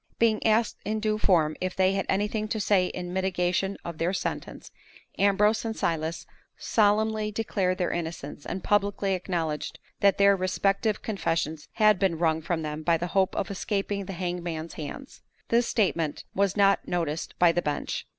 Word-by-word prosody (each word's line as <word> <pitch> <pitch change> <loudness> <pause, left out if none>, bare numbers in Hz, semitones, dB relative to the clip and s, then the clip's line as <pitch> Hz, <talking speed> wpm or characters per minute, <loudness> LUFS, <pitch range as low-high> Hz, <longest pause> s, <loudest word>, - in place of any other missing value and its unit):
Being 225 -2 +2
asked 220 +1 +2
in 215 +2 -1
due 215 0 0
form 160 -7 +3
if 185 0 -2
they 190 0 +3
had 195 0 -1
anything 210 +2 0
to 220 0 -2
say 195 -3 +3
in 180 0 -5
mitigation 190 +1 0
of 170 -2 -6
their 175 +3 +1
sentence, - - -4 0.5
Ambrose 210 +2 +3
and 225 -1 -3
Silas 160 0 -2 0.3
solemnly 215 0 +2
declared 200 -4 -1
their 180 - 0
innocence, 160 -4 -5
and 190 - -5
publicly 200 -1 +1
acknowledged 170 -4 -2 0.2
that 200 -1 +4
their 200 0 +6
respective 195 +3 0
confessions 165 -6 -2
had 215 -3 +4
been 185 -4 +1
wrung 160 -1 +1
from 160 0 -2
them 150 0 -4
by 165 +1 +2
the 175 +2 -4
hope 190 -1 +2
of 195 - -2
escaping 200 0 -2
the 195 - -6
hangman's 175 -2 -4
hands. 160 - -8 0.3
This 235 +1 +3
statement 165 -8 0
was 200 0 +1
not 200 -1 +3
noticed 165 -3 -2
by 175 -1 +5
the 175 - 0
bench. 150 -3 -3
190 Hz, 170 wpm, -27 LUFS, 170-205 Hz, 0.5 s, their